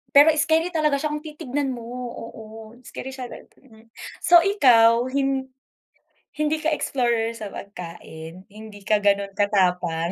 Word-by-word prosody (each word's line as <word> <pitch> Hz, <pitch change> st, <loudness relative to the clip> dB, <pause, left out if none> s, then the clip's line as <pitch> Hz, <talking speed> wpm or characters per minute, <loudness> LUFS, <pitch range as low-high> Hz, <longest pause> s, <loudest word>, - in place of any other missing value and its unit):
Pero 290 Hz, +2 st, +9 dB
scary 320 Hz, +2 st, +2 dB
talaga 305 Hz, -3 st, +1 dB
siya 305 Hz, -, -1 dB
kung 300 Hz, +1 st, -4 dB
titignan 285 Hz, -3 st, -3 dB
mo, 235 Hz, -, -9 dB, 0.3 s
oo, 225 Hz, -1 st, -9 dB, 0.4 s
scary 240 Hz, +3 st, -8 dB
siya, 255 Hz, -2 st, -6 dB
mm. 225 Hz, -4 st, -16 dB, 0.4 s
So, 345 Hz, 0 st, +7 dB
ikaw 245 Hz, -, +5 dB
hin 270 Hz, -1 st, 0 dB, 0.9 s
hindi 305 Hz, +1 st, +1 dB
ka 320 Hz, -, +1 dB
explorer 235 Hz, -6 st, 0 dB
sa 220 Hz, -2 st, -6 dB
pagkain, 170 Hz, -2 st, -10 dB
hindi 215 Hz, 0 st, -12 dB
ka 215 Hz, -1 st, +3 dB
gano'n 200 Hz, -1 st, +2 dB
katapang. 180 Hz, -5 st, +1 dB
235 Hz, 135 wpm, -23 LUFS, 205-290 Hz, 0.9 s, Pero